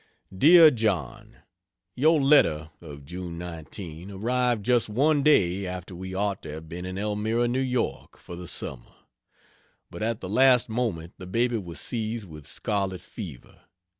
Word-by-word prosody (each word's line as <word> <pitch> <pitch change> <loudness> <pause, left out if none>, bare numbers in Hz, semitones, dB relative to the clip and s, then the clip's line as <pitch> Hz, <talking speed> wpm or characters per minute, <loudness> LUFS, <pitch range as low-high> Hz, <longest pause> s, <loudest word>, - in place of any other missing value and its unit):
DEAR 160 - +8
JOHN, 110 - -3 0.5
Your 155 +4 +3
letter 85 - +4
of 70 -4 -11
June 90 +1 -7
19 85 +1 -8
arrived 120 +2 0
just 120 -3 +2
one 145 +7 +2
day 100 -10 +3
after 90 0 -6
we 95 +1 -7
ought 100 0 -1
to - - -8
have 80 +1 -8
been 90 +3 -6
in 95 +1 -5
Elmira, 105 +3 0
N. 120 0 0
Y. 125 - -1
for 85 - -10
the 90 0 -8
summer: 65 -6 -6 1.0
but - - -8
at 115 0 -1
the 95 - -6
last 125 +3 +4
moment 110 -8 -2
the 90 - -8
baby 120 +5 +1
was 85 -7 -7
seized 110 - -3
with 75 -3 -11
scarlet 95 -3 -2
fever. 80 - -10
100 Hz, 155 wpm, -26 LUFS, 85-120 Hz, 1.0 s, DEAR